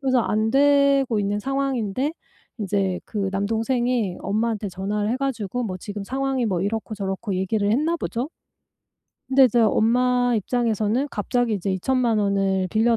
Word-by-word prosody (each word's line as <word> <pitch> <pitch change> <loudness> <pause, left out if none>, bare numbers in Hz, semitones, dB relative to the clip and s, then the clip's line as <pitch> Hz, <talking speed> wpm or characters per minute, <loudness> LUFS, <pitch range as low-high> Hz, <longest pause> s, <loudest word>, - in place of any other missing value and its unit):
그래서 260 -2 +2
안 215 0 0
되고 280 -3 +4
있는 205 0 -1
상황인데 270 0 -1 0.5
이제 195 -3 -1
그 200 -3 -2
남동생이 225 +1 0
엄마한테 215 +1 -1
전화를 205 +3 -2
해 245 - 0
가지고 250 -4 -2
뭐 185 -4 -4
지금 205 +2 -6
상황이 265 +2 -1
뭐 190 -6 0
이렇고 215 +3 -2
저렇고 195 0 -3
얘기를 200 +2 0
했나 305 +9 +1
보죠? 250 -4 -3 1.0
근데 270 0 +6
이제 240 -1 +3
엄마 245 +3 +3
입장에서는 225 +2 0
갑자기 240 +2 0
이제 200 -1 -1
20,000,000 235 +4 +1
원을 195 -2 +1
빌려 230 +2 +3
220 Hz, 325 characters per minute, -23 LUFS, 200-250 Hz, 1.0 s, 근데